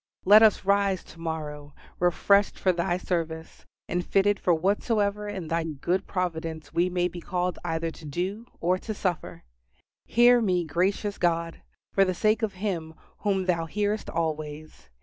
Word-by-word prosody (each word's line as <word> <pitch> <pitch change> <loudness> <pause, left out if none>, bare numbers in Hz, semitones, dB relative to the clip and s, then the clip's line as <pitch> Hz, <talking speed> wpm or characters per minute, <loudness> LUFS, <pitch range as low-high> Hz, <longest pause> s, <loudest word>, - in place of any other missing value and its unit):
Let 210 +3 +8
us 215 -3 +4
rise 200 -2 +2
to 170 - -15
morrow 150 -3 -5 0.2
refreshed 200 +3 +3
for 185 - +2
Thy 175 0 0
service; 165 -3 -4 0.2
and 175 +1 -1
fitted 200 +2 +2
for 180 - +1
whatsoever 205 +4 +1
in 190 -5 -5
Thy 165 +1 0
good 165 +5 -2
providence 165 -4 -3
we 175 +2 +2
may 180 0 +1
be 175 0 -8
called 180 -1 -2
either 165 0 -2
to 160 - -13
do 190 +10 -4
or 180 +2 +1
to 215 +2 -5
suffer. 180 -4 -3 0.6
Hear 240 +1 +5
me, 180 -5 +1
gracious 195 +6 -1
God, 170 -1 0 0.3
for 195 - +5
the 185 -1 0
sake 215 +5 +2
of 220 -3 -1
Him 180 -5 -4 0.2
whom 195 -2 0
Thou 170 -3 0
hearest 210 +4 -1
always. 155 - -4
180 Hz, 160 wpm, -26 LUFS, 165-200 Hz, 0.6 s, Let